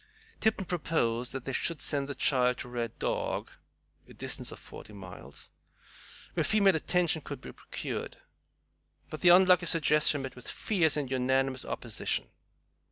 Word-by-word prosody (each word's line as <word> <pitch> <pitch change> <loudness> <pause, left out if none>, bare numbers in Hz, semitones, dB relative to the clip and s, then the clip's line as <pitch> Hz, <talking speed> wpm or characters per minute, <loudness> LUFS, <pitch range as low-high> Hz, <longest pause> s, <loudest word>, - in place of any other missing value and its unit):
Tipton 215 -3 +1
proposed 125 -9 0
that 135 -2 -6
they 135 - -3
should 165 +4 0
send 140 0 -1
the 140 - -4
child 125 -2 +3
to 125 - -6
Red 120 -2 -4
Dog, - - -2 0.6
a - - -13
distance - - -4
of - - -8
forty 105 - -11
miles, 95 -3 -9 0.8
where - - +1
female 200 -4 +4
attention 165 -1 +1
could - - -7
be - - -9
procured. - - -5 0.9
But 155 - -6
the 175 - +6
unlucky 180 0 +6
suggestion 150 -3 +3
met 135 - -6
with 125 - -10
fierce 165 -8 +1
and 140 -3 -2
unanimous 130 0 +1
opposition. 115 -3 -3
140 Hz, 150 wpm, -30 LUFS, 125-170 Hz, 0.9 s, the